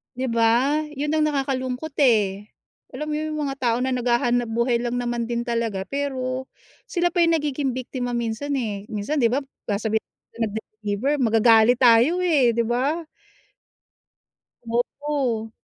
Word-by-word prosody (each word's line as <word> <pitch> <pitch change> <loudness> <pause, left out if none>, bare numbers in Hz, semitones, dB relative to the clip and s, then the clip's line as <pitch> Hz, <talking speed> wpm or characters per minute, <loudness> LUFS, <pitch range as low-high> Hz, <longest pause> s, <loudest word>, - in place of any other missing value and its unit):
'Di 260 +1 -2
ba, 235 +6 +3
'yun 295 +1 -2
ang 310 0 +2
nakakalungkot, 270 0 -2
eh, 210 -6 +2 0.5
alam 305 0 -4
mo - - -1
yung 310 0 -3
mga 275 -1 -2
tao 235 -2 +1
na 260 - 0
naghahanap-buhay 240 -1 +1
lang 240 0 -2
naman 240 -1 -2
din 235 0 -2
talaga, 230 -5 -2
pero, 260 +1 -3 0.4
sila 350 -4 0
pa 350 - -1
yung 330 0 +3
nagiging 290 -4 -1
biktima 250 -1 -4
minsan, 235 +5 -2
eh. 210 -6 -3
Minsan 220 +8 -2
'di 240 - +4
ba, 275 - +1 0.3
sasabihin 220 +1 -1 0.3
ng - - -6
nag-deliver, 215 +3 -3
magagalit 225 0 +5
tayo, 250 +9 +5
eh, 275 -10 +3
'di 235 - +2
ba? 270 +8 -1 1.6
Oo. 240 -1 -2
245 Hz, 140 wpm, -23 LUFS, 230-280 Hz, 1.6 s, magagalit